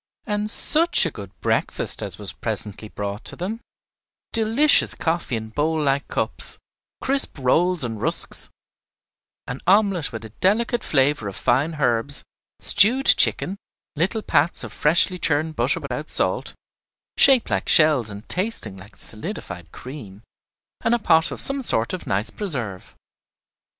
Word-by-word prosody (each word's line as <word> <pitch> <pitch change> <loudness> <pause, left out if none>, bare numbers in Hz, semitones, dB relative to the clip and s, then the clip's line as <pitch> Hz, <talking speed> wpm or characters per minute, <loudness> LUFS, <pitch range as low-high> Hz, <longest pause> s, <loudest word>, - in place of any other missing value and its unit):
And 210 -1 -2
such 320 - +4
a 165 - -2
good 100 -6 -10
breakfast - - -2
as - - -6
was - - -3
presently 105 +1 -4
brought 100 +2 -6
to - - -8
them, 210 +6 -6 0.7
delicious 230 +7 +4
coffee 165 -6 -2
in 110 -1 -6
bowl 155 +7 -1
like 140 -1 -1
cups, - - -2 0.5
crisp 275 - +1
rolls 170 +6 +1
and 115 -3 -5
rusks, - - -1 1.0
an 125 +2 -7
omelette 195 -4 +2
with 115 -1 -8
a - - -10
delicate 220 - -1
flavor 135 -5 +1
of 100 - -7
fine 155 +5 0
herbs, 125 0 +1 0.4
stewed 235 +7 +5
chicken, 195 +3 +3 0.4
little 190 +8 -2
pats 170 - +1
of - - -9
freshly 175 +4 +2
churned 155 0 0
butter - - 0
without - - -6
salt, - - +2 0.6
shaped 265 -4 +5
like - - -2
shells 150 - +4
and 100 +2 -6
tasting 185 - -2
like 95 +3 -15
solidified 95 - -7
cream, 115 -7 -11 0.6
and 235 - +2
a - - 0
pot 160 -7 +4
of - - -6
some 275 0 +5
sort 115 - 0
of 185 - -7
nice 100 +4 -2
preserve. 125 - -5
155 Hz, 145 wpm, -21 LUFS, -, 1.0 s, stewed